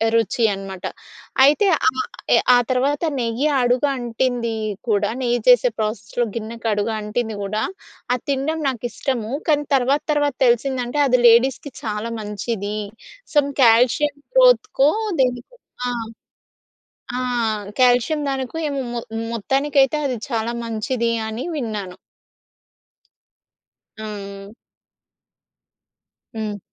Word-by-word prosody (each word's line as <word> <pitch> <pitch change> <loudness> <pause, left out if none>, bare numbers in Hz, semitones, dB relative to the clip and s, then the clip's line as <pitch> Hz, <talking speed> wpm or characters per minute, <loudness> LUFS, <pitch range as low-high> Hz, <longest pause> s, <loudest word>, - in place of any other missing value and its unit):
రుచి 230 +1 +1
అనమాట. 195 -1 -7 0.6
అయితే, 345 +9 +4 0.2
ఆహ్, 430 +6 +1 0.3
ఎ - - +6 0.2
ఆ - - +6
తర్వాత 275 +4 +1 0.2
నెయ్యి 235 +5 0
అడుగు 245 +4 +2
అంటిందీ 240 -1 -1 0.3
కూడా, 205 0 +2
నెయ్యి 240 -1 +1
చేసే 245 -1 +6
ప్రాసెస్‌లో 215 +2 -2
గిన్నెకు 230 +1 -5
అడుగు 210 +2 -1
అంటింది 215 0 -3
గూడా, 215 +2 -2 0.5
అది 245 - -8
తినడం 305 +4 -1
నాకిష్టము, 240 -1 -3 0.2
కానీ 295 -1 +2
తర్వాత 270 +3 +2
తర్వాత 290 -3 +1
తెలిసిందంటే, 250 +3 0
అది 250 -1 +3
లేడీస్‌కి 255 +4 +3
చాలా 215 +1 -3
మంచిది. 210 0 -4 0.6
సమ్ 285 -1 +3
కాల్షియం 250 +6 +4 0.2
గ్రోత్‌కో, 465 - +5 0.3
దేనికో 250 - -1 0.3
ఆ! - - 0 1.3
ఆ! - - -1 0.6
కాల్షియం 250 +5 +3
దానికో 265 +3 -4
ఏమో, 280 -1 -2
మొ 235 - -2 0.3
మొత్తానికైతే 270 +5 +2
అది 255 -2 -1
చాలా 230 0 -1
మంచిది 230 +1 -1 0.2
అని 220 +3 -4
విన్నాను. 210 -8 -4 2.0
ఆ! 200 -2 -7 1.9
హ్మ్. 210 -2 -4
240 Hz, 105 wpm, -21 LUFS, 220-270 Hz, 2.0 s, ఎ